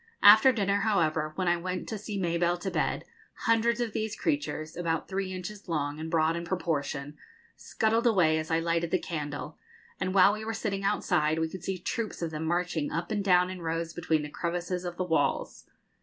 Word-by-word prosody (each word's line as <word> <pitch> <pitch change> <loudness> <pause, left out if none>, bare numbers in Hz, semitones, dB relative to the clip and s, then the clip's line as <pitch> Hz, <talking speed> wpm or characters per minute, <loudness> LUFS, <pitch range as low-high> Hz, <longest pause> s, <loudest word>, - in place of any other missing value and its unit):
After 220 +5 +9
dinner, 200 -4 +1
however, 160 -8 +1
when 185 +1 -1
I 175 0 +3
went 180 +1 -4
to 220 - -3
see 205 -1 -4
Mabelle 175 0 +1
to 190 - -3
bed, - - -1 0.4
hundreds 230 +1 +2
of 235 -3 -2
these 220 0 -2
creatures, 285 - -2
about 165 -2 -1
three 190 -1 -2
inches 185 +2 -7
long, 145 -2 -1
and 160 +1 -5
broad 160 0 +2
in 170 - -3
proportion, 150 -5 -2 0.4
scuttled 225 +2 +1
away 170 -8 +4
as 155 - -5
I 165 - +2
lighted 165 0 0
the 185 - +2
candle; 150 -3 -5 0.4
and 185 0 -2
while 195 +1 +7
we 215 +1 -5
were 225 +1 -3
sitting 200 -3 -2
outside 160 -5 +1
we 160 0 0
could 185 +1 -8
see 190 -1 -2
troops 215 +1 -3
of 165 - -2
them 155 +1 -4
marching 175 -2 -1
up 170 +3 -3
and 205 -2 0
down 180 -1 +4
in 185 -1 -7
rows 165 0 -2
between 160 -3 0
the 150 - -5
crevices 175 +3 -3
of 175 -1 -5
the 185 - 0
walls. 150 -5 -1
175 Hz, 200 wpm, -29 LUFS, 160-200 Hz, 0.4 s, After